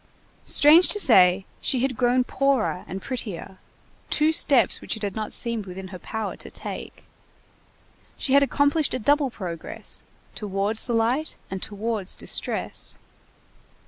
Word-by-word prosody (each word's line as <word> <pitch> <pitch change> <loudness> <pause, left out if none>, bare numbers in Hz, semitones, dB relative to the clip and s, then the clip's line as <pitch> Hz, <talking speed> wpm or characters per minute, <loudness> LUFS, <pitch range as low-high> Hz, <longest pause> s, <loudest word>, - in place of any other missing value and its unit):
Strange 315 +5 +7
to 415 - +1
say, 190 - +5 0.2
she 255 - 0
had 260 -1 0
grown 250 +1 +2
poorer 260 -8 0
and 190 +1 -6
prettier, 200 -7 -5 0.5
two 305 +1 +3
steps 270 -8 +3
which - - -3
it 220 - -9
had 200 -2 -3
not 215 -1 -4
seemed 230 -4 -1
within 185 +1 -8
her 185 -1 -9
power 220 +2 -4
to - - -10
take. - - -8 1.1
She 265 - -1
had 280 - +7
accomplished 285 +2 +2
a - - 0
double 285 +3 +2
progress, 175 -8 -6 0.3
towards 205 +2 0
the 240 - -1
light 240 +7 0 0.2
and 190 -1 -4
towards 210 -2 -2
distress. - - -4
230 Hz, 145 wpm, -24 LUFS, 195-275 Hz, 1.1 s, Strange